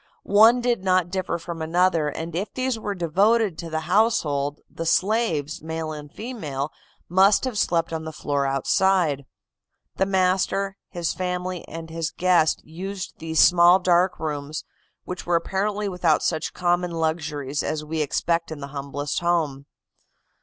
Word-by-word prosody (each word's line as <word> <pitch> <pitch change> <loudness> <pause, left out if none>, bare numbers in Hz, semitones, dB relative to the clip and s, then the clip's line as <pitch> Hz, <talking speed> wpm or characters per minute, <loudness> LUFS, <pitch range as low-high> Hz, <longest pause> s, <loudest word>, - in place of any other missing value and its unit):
One 225 +4 +6
did 240 -5 0
not 185 -2 +2
differ 185 -2 -2
from 170 -1 -7
another, 165 -1 +2
and 160 +3 -6
if 195 +5 -2
these 255 -3 -1
were 205 -2 -3
devoted 195 +4 +2
to 170 - -6
the 160 0 -2
household 155 -9 +1
the 165 - -6
slaves, 175 -8 +1
male 160 0 -4
and 150 -1 -8
female, 155 - -5 0.4
must 195 +6 +4
have 255 -3 -3
slept 170 -5 +1
on 160 0 -3
the 160 - -5
floor 145 -2 -1
outside. 145 +1 +2 0.7
The 190 - +2
master, 190 +1 +1
his 175 -3 -2
family 180 -1 -3
and 165 0 -8
his 165 -1 -2
guest 175 -4 +2
used 185 +4 -7
these 160 0 -1
small, 175 0 +7
dark 180 0 +2
rooms, 150 -1 -4 0.4
which 180 -1 -7
were 175 - +2
apparently 200 +4 -1
without 180 -5 +1
such 160 -2 -1
common 175 0 0
luxuries 155 -4 -2
as 155 -1 -3
we 155 +1 -2
expect 165 +3 0
in 155 - -6
the 140 0 -7
humblest 140 0 -3
home. 160 -6 0
170 Hz, 155 wpm, -24 LUFS, 155-190 Hz, 0.7 s, small